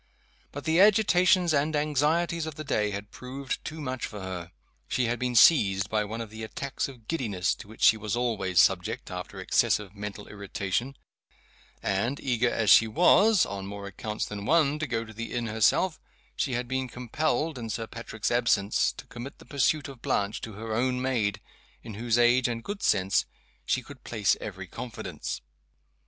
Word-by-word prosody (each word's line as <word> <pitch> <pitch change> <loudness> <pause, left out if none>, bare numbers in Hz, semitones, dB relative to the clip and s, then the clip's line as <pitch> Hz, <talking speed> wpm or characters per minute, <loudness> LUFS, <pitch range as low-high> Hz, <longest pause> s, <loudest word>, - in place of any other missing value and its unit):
But 145 - -7
the 160 +2 +2
agitations 185 -4 +5
and 150 +2 +1
anxieties 155 +3 +1
of 155 - -6
the 155 - -6
day 105 -7 0
had 100 0 -6
proved 130 +2 -5
too 160 +1 -6
much 130 -4 -3
for 105 - -8
her. 90 -3 -6 0.4
She 125 - 0
had 120 +1 -1
been 125 -1 -1
seized 100 - +5
by 105 -1 +1
one 110 +3 -5
of 110 -2 -7
the 110 +1 -8
attacks 135 +5 -3
of 120 -5 -13
giddiness 105 - 0
to - - -11
which 110 - -8
she 110 - +7
was 105 -1 -3
always 110 -7 0
subject 95 +7 +2
after 90 0 -6
excessive 100 -2 +1
mental 105 0 -7
irritation; 100 +5 -3 0.9
and, 115 +8 0
eager 120 -2 +1
as 110 -4 +2
she 110 +4 +8
was 180 - +5
(on 100 -1 -6
more 100 0 -7
accounts 105 +2 -4
than 105 -1 -6
one) 150 -3 +3
to 155 - -2
go 115 -2 -2
to 110 - -12
the 115 +2 -6
inn 120 -1 -1
herself, 110 - +2 0.4
she 135 - -1
had 120 0 -2
been 130 +1 -1
compelled, 150 +4 -1
in 115 -1 -5
Sir 115 +1 -3
Patrick's 110 -1 -4
absence, 115 -4 +2
to - - -11
commit 120 +4 -9
the - - -16
pursuit 145 +1 +1
of 135 -4 -11
Blanche 100 +1 -1
to 110 - -7
her 110 +2 -5
own 125 +2 +1
maid, 115 -6 0 0.4
in 115 - -8
whose 115 +2 0
age 120 +1 +4
and 115 -1 -3
good 205 +5 -5
sense 95 -1 +2 0.4
she 130 - +1
could 140 0 -13
place 105 -4 +1
every 95 -2 -6
confidence. 115 +6 -6
120 Hz, 185 wpm, -27 LUFS, 105-140 Hz, 0.9 s, she